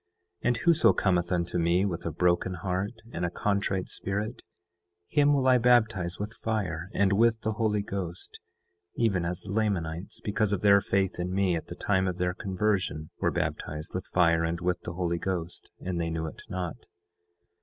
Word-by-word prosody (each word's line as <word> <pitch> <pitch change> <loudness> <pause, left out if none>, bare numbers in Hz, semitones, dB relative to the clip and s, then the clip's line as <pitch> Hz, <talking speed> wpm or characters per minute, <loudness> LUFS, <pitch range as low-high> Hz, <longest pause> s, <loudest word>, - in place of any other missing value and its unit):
And 125 -1 +2
whoso 170 +6 +5
cometh 90 -3 +1
unto 85 0 0
me 85 +3 +3
with 85 -4 -3
a - - -1
broken 90 +3 +1
heart 95 +6 -3
and 85 - -3
a 90 - +1
contrite 100 0 -1
spirit, 105 +4 -3 0.7
him 145 -1 +4
will 135 -2 +2
I 130 -1 +6
baptize 110 -7 +3
with 105 +2 -4
fire 95 -8 -2
and 100 -1 +3
with 115 +2 +3
the 110 - 0
Holy 105 -2 0
Ghost, 95 -4 -5 0.6
even 95 -7 +1
as 85 0 -3
the 100 - -7
Lamanites, 95 -5 -1
because 105 0 0
of 100 - -1
their 100 -1 +6
faith 95 -2 0
in 90 +1 -2
me 95 -2 +2
at 80 - -5
the - - -7
time 95 -2 +1
of 90 -1 -2
their 90 0 0
conversion, 95 -5 -1
were - - +2
baptized 75 +2 -3
with 90 - -4
fire 85 -2 +3
and 85 +1 -1
with 90 +1 -1
the 90 - -6
Holy 85 -1 -1
Ghost, 90 -2 -4
and 90 -2 -3
they 85 - -1
knew 80 0 -2
it 80 - -7
not. 90 -1 -5
95 Hz, 185 wpm, -28 LUFS, 85-105 Hz, 0.7 s, I